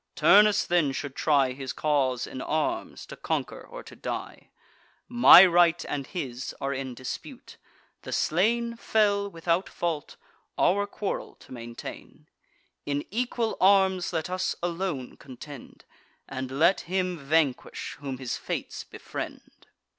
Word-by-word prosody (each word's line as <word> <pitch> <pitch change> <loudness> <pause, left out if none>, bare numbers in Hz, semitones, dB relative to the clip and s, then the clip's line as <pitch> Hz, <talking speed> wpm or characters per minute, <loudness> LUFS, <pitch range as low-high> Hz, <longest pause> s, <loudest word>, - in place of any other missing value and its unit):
Turnus 210 0 +5
then 170 -6 +2
should 140 0 -5
try 140 -4 +2
His 130 0 -5
cause 135 -5 0
in 130 - -7
arms, 335 - -2
to - - -10
conquer - - -3
or - - -10
to - - -13
die. - - -6 0.6
My 240 -6 +9
right 175 -1 +4
and 140 -2 -3
his 130 -7 -5
are 140 0 -2
in 130 -2 -5
dispute: 130 +1 -8 0.4
the - - -8
slain 235 +7 +1
Fell 205 -3 +1
without 170 +1 -1
fault, 165 -4 -3 0.4
our 205 +2 +2
quarrel 205 0 -4
to - - -19
maintain. 120 -1 -9 0.6
In 145 0 -2
equal 235 0 -1
arms 190 -1 +4
let 160 -3 -2
us 185 +1 -1
alone 170 -7 -3
contend; 135 +1 -12 0.4
And 130 -1 -5
let 155 +8 +3
him 180 -1 -2
vanquish, 140 -2 0
whom 135 -2 -5
his 125 -2 -4
fates - - -5
befriend. - - -8
165 Hz, 130 wpm, -27 LUFS, 135-190 Hz, 0.6 s, My